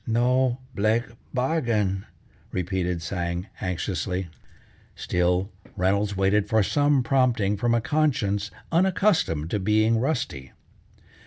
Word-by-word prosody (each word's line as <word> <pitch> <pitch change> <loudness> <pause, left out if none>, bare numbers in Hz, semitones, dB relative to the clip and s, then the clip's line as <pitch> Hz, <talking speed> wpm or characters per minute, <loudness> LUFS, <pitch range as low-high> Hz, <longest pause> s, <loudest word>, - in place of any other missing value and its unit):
"No 125 +2 +2 0.2
blake 110 +3 +2 0.3
bargain!" 115 -8 0 0.4
repeated 90 -2 -2
Tsang 85 0 -3 0.2
anxiously. 90 -1 -2 0.7
Still 90 +3 0 0.3
Reynolds 100 +2 +1
waited 100 +2 +2
for 110 -1 +3
some 145 +3 +2
prompting 120 -6 +2
from 120 +3 +1
a 115 - +1
conscience 110 -8 0 0.2
unaccustomed 175 - +2
to 105 - 0
being 110 +3 +2
rusty. 120 - -2
105 Hz, 100 wpm, -25 LUFS, 95-125 Hz, 0.7 s, for